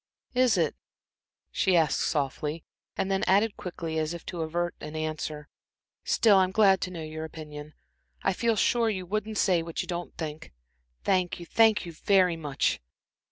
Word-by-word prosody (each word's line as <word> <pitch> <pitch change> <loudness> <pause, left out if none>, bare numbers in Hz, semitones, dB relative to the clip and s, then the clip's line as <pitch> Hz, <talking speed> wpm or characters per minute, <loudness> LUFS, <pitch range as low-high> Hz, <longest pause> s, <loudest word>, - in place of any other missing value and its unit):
"Is 250 -4 +4
it," 165 -4 +1 0.8
she 185 -2 +3
asked 160 -4 +2
softly, 150 +2 -1 0.3
and 195 - -1
then 195 - +1
added 200 +3 +3
quickly, 165 -3 -4
as 155 +2 -2
if 170 - -10
to 175 - -5
avert 175 +2 -1
an 150 +1 -7
answer, 155 -1 -4 0.6
"still, 210 -4 +4
I'm 185 -1 +4
glad 195 -2 +4
to - - -2
know 170 -3 -6
your 155 0 -6
opinion. 150 -1 -9 0.5
I 195 - +2
feel 230 +4 +1
sure 230 +2 +2
you 190 -4 -3
wouldn't 215 +3 -3
say 180 -4 +3
what 165 0 -4
you - - -10
don't 175 0 -5
think. 155 -1 -6 0.5
Thank 185 -3 +1
you 175 - -8
thank 220 +2 +4
you 170 - -6
very 185 +1 +3
much." 150 -4 -1
175 Hz, 170 wpm, -28 LUFS, 155-195 Hz, 0.8 s, Is